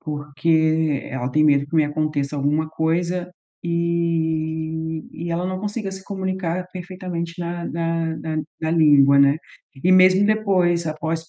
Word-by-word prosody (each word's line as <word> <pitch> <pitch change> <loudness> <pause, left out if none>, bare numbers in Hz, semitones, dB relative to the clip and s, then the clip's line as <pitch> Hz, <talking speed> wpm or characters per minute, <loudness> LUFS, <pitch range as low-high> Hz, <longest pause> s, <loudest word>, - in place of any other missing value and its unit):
porque 155 0 0
ela 130 0 -3
tem 155 +3 +3
medo 140 -1 +3
que 160 - -3
me 155 - +5
aconteça 150 -1 -2
alguma 150 +3 0
coisa 175 +3 -1 0.3
e 165 -2 -1 0.4
e 170 +1 -6
ela 175 +2 -1
não 185 0 -3
consiga 205 -1 -4
se 190 0 -8
comunicar 190 -3 -3
perfeitamente 180 -2 -5
na 175 0 -4
na 165 -1 -2
na 155 0 -4 0.2
na 160 0 -1
língua, 145 -4 +5
né. 140 +1 +5 0.5
E 185 - +5
mesmo 185 +2 +6
depois 185 -6 +2
após 160 +1 -3
165 Hz, 145 wpm, -22 LUFS, 155-180 Hz, 0.5 s, mesmo